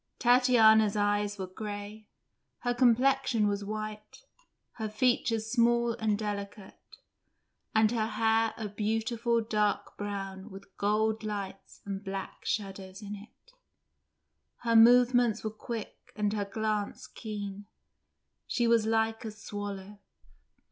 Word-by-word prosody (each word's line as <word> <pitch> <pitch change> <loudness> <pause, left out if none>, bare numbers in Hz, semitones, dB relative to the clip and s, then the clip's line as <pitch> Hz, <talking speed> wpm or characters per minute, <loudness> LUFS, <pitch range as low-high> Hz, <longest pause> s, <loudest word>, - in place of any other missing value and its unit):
Tatiana's 225 -4 +5
eyes 205 0 +1
were 190 - -3
grey, 205 +2 -7 0.5
her 245 - 0
complexion 250 -1 +3
was 205 0 -1
white, 215 0 -6 0.5
her 220 -2 -3
features 225 -1 +1
small 235 -1 +3
and 215 -2 +1
delicate, 205 -1 -6 1.0
and 220 0 +4
her 220 -2 0
hair 225 0 +1
a 220 - -4
beautiful 225 +3 0
dark 210 -2 0
brown 195 -1 -5
with 195 -1 -13
gold 215 +2 +1
lights 200 -2 -6
and 195 0 -5
black 195 -1 -6
shadows 195 -1 -4
in 205 0 -6
it; 220 - -16 1.1
her 230 -1 +2
movements 240 -1 +6
were 215 - -2
quick 220 0 -7
and 210 -1 0
her 205 -2 -1
glance 210 0 -2
keen; 205 -2 -7 0.8
she 240 - 0
was 230 -2 +3
like 225 +1 +1
a 225 - -4
swallow. 205 -1 -7
215 Hz, 120 wpm, -30 LUFS, 205-225 Hz, 1.1 s, movements